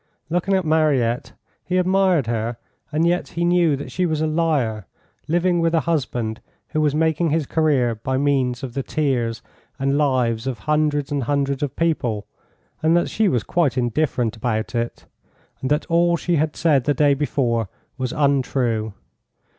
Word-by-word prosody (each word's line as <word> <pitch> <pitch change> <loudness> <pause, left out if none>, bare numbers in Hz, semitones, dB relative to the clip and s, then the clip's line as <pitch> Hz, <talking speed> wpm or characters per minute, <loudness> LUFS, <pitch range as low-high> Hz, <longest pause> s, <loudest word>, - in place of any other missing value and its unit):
Looking 180 +3 +1
at 190 -2 0
Mariette, 145 -7 +1 0.3
he 185 - -1
admired 185 -5 +3
her, 115 0 -2 0.3
and 155 +2 +1
yet 175 +1 +1
he 170 +1 -2
knew 175 -3 +3
that 135 -2 -7
she 180 +6 0
was 155 -2 -1
a 155 - +1
liar, 150 - 0 0.4
living 175 +2 +2
with 165 0 +2
a 160 - +3
husband 125 -8 -2 0.3
who 155 - 0
was 150 -1 +1
making 160 +1 +1
his 155 0 0
career 140 -6 +2
by 130 +4 -2
means 135 -3 0
of 125 -3 -5
the 135 - -2
tears 125 -7 -1 0.3
and 135 +1 +1
lives 125 -5 +1
of 130 -3 -2
hundreds 150 -1 0
and 140 -4 -1
hundreds 140 0 0
of 145 -2 -2
people, 125 -11 0 0.6
and 160 +2 +4
that 175 - 0
she 220 -1 +2
was 120 - 0
quite 140 0 0
indifferent 120 -2 0
about 110 -1 -2
it, 120 0 -3 0.6
and 130 - -2
that 150 +2 +1
all 170 +1 +2
she 175 0 0
had 155 +1 0
said 150 -6 +2
the 145 - +2
day 145 +1 +4
before 120 -6 0 0.3
was 130 -2 -2
untrue. 125 -6 0
145 Hz, 170 wpm, -22 LUFS, 120-160 Hz, 0.6 s, and